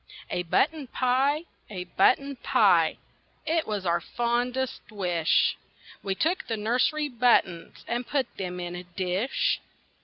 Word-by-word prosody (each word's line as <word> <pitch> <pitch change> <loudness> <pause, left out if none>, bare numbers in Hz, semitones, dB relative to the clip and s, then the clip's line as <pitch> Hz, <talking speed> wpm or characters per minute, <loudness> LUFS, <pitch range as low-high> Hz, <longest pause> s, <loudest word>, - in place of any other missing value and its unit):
A 180 - 0
BUTTON 285 - +1
pie! 265 +6 +1 0.3
a 185 -4 -5
button 265 +10 +2
pie! - - +3 0.5
It 325 +1 0
was 205 -3 -3
our 170 -1 +1
fondest 245 +2 -1
wish. 180 -6 +1 0.5
We 195 -1 -2
took 335 - 0
the 225 - -2
nursery 250 +8 +1
buttons 235 -9 +1
And 240 +1 -2
put 275 -3 +1
them 180 -2 -4
in 175 0 -5
a 180 - -6
dish. 185 +7 -1
235 Hz, 130 wpm, -27 LUFS, 180-265 Hz, 0.5 s, pie